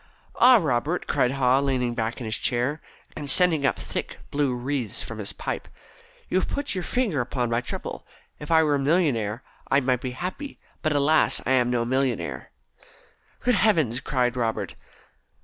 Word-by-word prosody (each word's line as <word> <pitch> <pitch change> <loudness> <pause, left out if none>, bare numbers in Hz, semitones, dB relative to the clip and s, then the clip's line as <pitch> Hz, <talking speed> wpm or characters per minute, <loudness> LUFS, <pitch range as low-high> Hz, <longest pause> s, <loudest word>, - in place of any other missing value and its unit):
"Ah, 250 0 +8
Robert," 155 - 0
cried 130 -3 +1
Haw, 130 -1 +3
leaning 130 -3 0
back 115 0 -2
in 120 - -5
his 110 0 -1
chair, 130 +5 0 0.3
and 145 -2 -6
sending 160 -3 +4
up - - 0
thick - - -5
blue 140 -3 +1
wreaths 125 -3 -2
from 115 -1 -8
his 100 - -2
pipe. - - -5 0.6
"You 185 - +1
have - - -3
put 285 0 -2
your 185 -2 -3
finger 210 - 0
upon 120 -1 -2
my 115 +1 +1
trouble. 125 - -6 0.3
If 150 - -8
I 160 -1 +5
were 150 -2 +2
a 140 - +1
millionaire 135 - +1 0.3
I 135 - +4
might 125 -2 0
be 130 - -3
happy, 190 - -5 0.2
but, 155 -2 +1
alas, 150 +2 +3
I - - 0
am 125 -2 +3
no 120 -1 0
millionaire!" 130 -1 -1 0.9
"Good 250 - +2
heavens!" 155 - +2
gasped 125 -4 0
Robert. 115 -2 -1
135 Hz, 175 wpm, -25 LUFS, 120-155 Hz, 0.9 s, Ah